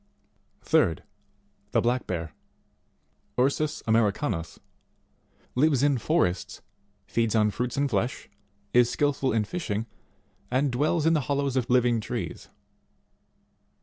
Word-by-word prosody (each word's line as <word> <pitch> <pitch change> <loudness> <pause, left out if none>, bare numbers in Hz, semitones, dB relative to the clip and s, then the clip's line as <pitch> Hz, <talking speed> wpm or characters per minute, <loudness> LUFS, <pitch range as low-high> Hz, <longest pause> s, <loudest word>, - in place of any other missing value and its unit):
10. - - +5
3d. - - -17 0.7
The - - +4
Black 125 +2 0
Bear 80 -4 -4 1.0
Ursits 140 +4 +1
Jlmericanus 105 - 0 1.0
lives 140 0 +3
in 140 -3 +3
forests, 110 - 0 0.4
feeds 115 +1 0
on 105 -1 +3
fruits 125 +3 -3
and 140 0 +2
flesh, 120 +1 -2 0.5
is 125 -1 +5
skilful 140 0 0
in 110 -1 +2
fishing, 110 - -3 0.6
and 130 +2 +1
dwells 150 +5 +1
in 165 - +4
the 155 - +2
hollows 140 -1 0
of 130 -2 0
living 120 -2 +3
trees. - - -5
125 Hz, 115 wpm, -27 LUFS, 110-140 Hz, 1.0 s, 10